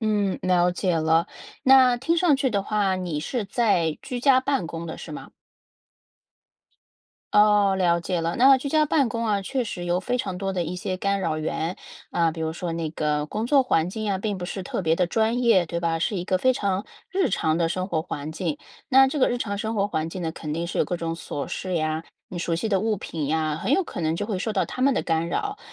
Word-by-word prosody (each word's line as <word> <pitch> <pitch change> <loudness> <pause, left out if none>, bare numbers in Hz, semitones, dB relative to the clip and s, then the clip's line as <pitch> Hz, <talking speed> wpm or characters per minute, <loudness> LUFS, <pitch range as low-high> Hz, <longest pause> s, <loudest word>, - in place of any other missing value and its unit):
嗯， 210 -3 0
了 180 -1 +3
解 180 0 0
了， 160 +1 +2 0.4
那 260 -2 +6
听 315 +8 0
上 330 -5 +4
去 270 -1 0
的 200 -3 0
话， 200 -2 0
你 175 -5 -3
是 220 - -3
在 190 -8 +1
居 250 -2 -5
家 260 0 +5
办 270 -8 -1
公 165 0 -6
的， 160 - -7
是 - - -9
吗？ - - -8 2.0
哦， 210 -1 +5
了 170 -2 +2
解 175 0 -2
了。 165 +1 -2
那 265 +2 +7
居 270 +2 -4
家 305 +1 +3
办 285 -4 +2
公 230 +1 -2
啊， 205 -2 +1
确 255 +5 -2
实 180 -5 -5
有 175 0 +1
非 250 +4 -1
常 190 -7 -3
多 195 0 -2
的 180 -2 -1
一 170 +2 -4
些 185 +1 -3
干 200 +1 0
扰 160 -4 -1
源。 160 +3 -2 0.3
啊， 170 -1 +2
比 160 +1 -8
如 160 0 -1
说 170 +1 -4
那 165 -1 -2
个 150 -1 -1
工 215 +8 -3
作 275 +1 +5
环 170 -9 +1
境 215 +2 -5
呀， 200 -2 0
并 200 0 -3
不 180 - -5
是 190 +1 -5
特 185 - -3
别 160 -3 +2
的 180 +1 +1
专 225 +6 +1
业， 210 -8 +4
对 170 +1 -3
吧？ 165 -1 0
是 195 +5 -1
一 175 - -3
个 185 0 +1
非 255 +6 +3
常 200 -4 -1 0.2
日 380 0 +1
常 160 0 0
的 165 -1 +2
生 185 +2 -2
活 165 -5 0
环 155 -2 -5
境。 225 - -3 0.3
那 270 0 +6
这 295 - -3
个 260 - +4
日 245 - -1
常 200 -4 -3
生 220 +2 -2
活 200 -1 +1
环 160 -5 -2
境 180 +2 -6
呢， 165 - -1
肯 155 -2 -6
定 170 +2 -2
是 - - -4
有 - - +3
各 175 - -3
种 165 -1 -3
琐 145 -3 -5
事 185 -1 -4
呀， 155 0 -1 0.2
你 180 - -6
熟 170 0 -1
悉 175 +7 -2
的 195 -2 +2
物 220 0 0
品 160 -5 -4
呀， 155 0 0
很 - - 0
有 385 - +4
可 330 - -7
能 160 -1 0
就 190 - -2
会 205 -3 -2
受 220 +3 -2
到 195 - +1
它 - - -7
们 270 +1 +4
的 - - 0
干 165 0 0
扰。 410 - -2
190 Hz, 265 characters per minute, -24 LUFS, 165-230 Hz, 2.0 s, 那